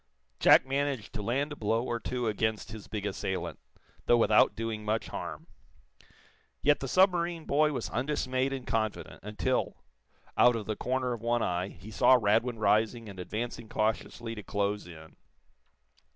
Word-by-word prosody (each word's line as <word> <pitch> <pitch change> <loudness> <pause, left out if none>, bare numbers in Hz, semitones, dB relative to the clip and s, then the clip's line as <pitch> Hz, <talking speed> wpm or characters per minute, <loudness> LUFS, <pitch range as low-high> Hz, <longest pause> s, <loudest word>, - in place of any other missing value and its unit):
Jack - - +7
managed 135 -4 -2
to 105 - -4
land 135 +8 -1
a - - -4
blow 115 -1 0
or 120 -2 -2
two 125 +2 -3
against 110 0 -1
his 110 -2 -9
big 105 -2 -4
assailant, 95 -2 -3 0.5
though 120 - +6
without 110 -2 +4
doing 115 -1 -3
much 110 +1 -1
harm. - - -6 1.2
Yet 145 - +4
the 135 - -4
submarine 175 -1 +2
boy 150 +2 +3
was 135 - -4
undismayed 130 0 -1
and 135 -2 -4
confident, 110 -2 -2
until, 105 +1 -2 0.5
out 120 -1 +5
of 110 -2 -4
the 110 - -2
corner 130 +1 -1
of 115 - -6
one 120 0 +1
eye, 90 +1 -1
he 100 +3 -12
saw 130 +4 +6
Radwin 115 +3 +2
rising 110 +2 +1
and 95 -2 -10
advancing 110 +5 -5
cautiously 110 +1 -2
to 110 - -7
close 100 -1 -2
in. 80 -2 -13
115 Hz, 160 wpm, -30 LUFS, 105-130 Hz, 1.2 s, Jack